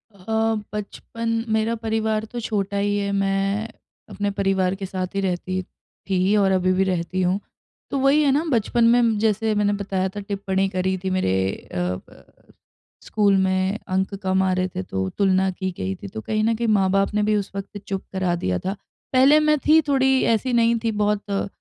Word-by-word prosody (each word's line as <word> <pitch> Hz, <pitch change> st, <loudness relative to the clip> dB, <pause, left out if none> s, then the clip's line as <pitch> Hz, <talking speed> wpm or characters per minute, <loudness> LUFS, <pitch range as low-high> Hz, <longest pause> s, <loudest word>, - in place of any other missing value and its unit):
अ, 220 Hz, +3 st, 0 dB, 0.2 s
बचपन 225 Hz, +2 st, -5 dB, 0.2 s
मेरा 220 Hz, +1 st, +1 dB
परिवार 220 Hz, -1 st, -1 dB
तो 240 Hz, +2 st, -6 dB
छोटा 205 Hz, -3 st, -2 dB
ही 205 Hz, +1 st, +1 dB
है 200 Hz, 0 st, -1 dB
मैं, 195 Hz, +2 st, 0 dB, 0.4 s
अपने 205 Hz, 0 st, -2 dB
परिवार 195 Hz, -2 st, 0 dB
के 195 Hz, 0 st, -5 dB
साथ 185 Hz, 0 st, -4 dB
ही 195 Hz, -, +1 dB
रहती 185 Hz, 0 st, -2 dB, 0.5 s
थी 190 Hz, +2 st, +2 dB
और 195 Hz, -2 st, +3 dB
अभी 185 Hz, -1 st, +2 dB
भी 190 Hz, -, +2 dB
रहती 185 Hz, 0 st, -1 dB
हूँ, 185 Hz, +2 st, +1 dB, 0.5 s
तो 275 Hz, -, 0 dB
वही 275 Hz, +3 st, +4 dB
है 280 Hz, -, +3 dB
ना 290 Hz, +4 st, +2 dB
बचपन 235 Hz, 0 st, +1 dB
में 235 Hz, -3 st, +3 dB
जैसे 220 Hz, 0 st, +1 dB
मैंने 205 Hz, 0 st, +2 dB
बताया 195 Hz, -2 st, -2 dB
था 205 Hz, -, -7 dB
टिप्पणी 195 Hz, -1 st, -1 dB
करी 190 Hz, 0 st, -1 dB
थी 190 Hz, -, -1 dB
मेरे 185 Hz, -, +1 dB, 0.4 s
अ -, -, -3 dB
अ, 90 Hz, +1 st, -4 dB, 0.8 s
स्कूल 205 Hz, -2 st, +2 dB
में 190 Hz, +2 st, +1 dB
अंक 190 Hz, +2 st, -1 dB
कम 190 Hz, 0 st, +2 dB
आ 190 Hz, -, +1 dB
रहे 185 Hz, 0 st, 0 dB
थे -, -, -1 dB
तो 95 Hz, 0 st, -3 dB
तुलना 190 Hz, -1 st, +3 dB
की 190 Hz, +1 st, -4 dB
गई 95 Hz, +1 st, -2 dB
थी 100 Hz, -, -9 dB
तो 110 Hz, -, -5 dB
कहीं 215 Hz, -, -1 dB
न 225 Hz, +1 st, +2 dB
कहीं 230 Hz, +1 st, -2 dB
माँ-बाप 195 Hz, -1 st, +2 dB
ने 210 Hz, 0 st, +1 dB
भी 210 Hz, 0 st, +2 dB
उस 200 Hz, -1 st, -4 dB
वक़्त 200 Hz, +1 st, -6 dB
चुप 195 Hz, -1 st, -3 dB
करा 185 Hz, -2 st, 0 dB
दिया 90 Hz, -, -1 dB
था। 190 Hz, -, -3 dB, 0.4 s
पहले 270 Hz, +4 st, +6 dB
मैं 305 Hz, 0 st, +3 dB
थी 315 Hz, +1 st, +7 dB
थोड़ी 265 Hz, -1 st, +3 dB
ऐसी 245 Hz, +3 st, -1 dB
नहीं 235 Hz, 0 st, +3 dB
थी 225 Hz, -, +1 dB
बहुत 210 Hz, 0 st, 0 dB
अ, 195 Hz, -, -1 dB
200 Hz, 195 wpm, -23 LUFS, 190-220 Hz, 0.8 s, थी